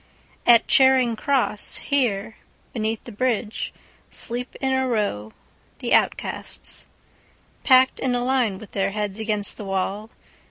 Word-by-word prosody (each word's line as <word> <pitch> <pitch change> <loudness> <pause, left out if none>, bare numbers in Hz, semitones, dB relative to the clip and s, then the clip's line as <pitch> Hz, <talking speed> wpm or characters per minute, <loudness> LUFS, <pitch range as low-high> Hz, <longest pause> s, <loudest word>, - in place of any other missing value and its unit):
At 235 -1 +7
Charing 260 -3 +5
Cross, 250 -4 0
here, 230 -6 0 0.4
beneath 220 -1 -2
the 240 - -10
bridgeSleep 240 +1 -4
in 265 -1 0
a 260 0 +1
row 200 - -2 0.5
the - - -2
outcasts, - - 0 0.8
Packed 260 0 +5
in 255 -2 0
a 245 - -1
line 250 -7 +1
with 205 +1 -12
their 195 0 0
heads 210 -1 -3
against 210 -2 -1
the 210 - -7
wall. 195 +3 -2
225 Hz, 125 wpm, -23 LUFS, 205-255 Hz, 0.8 s, At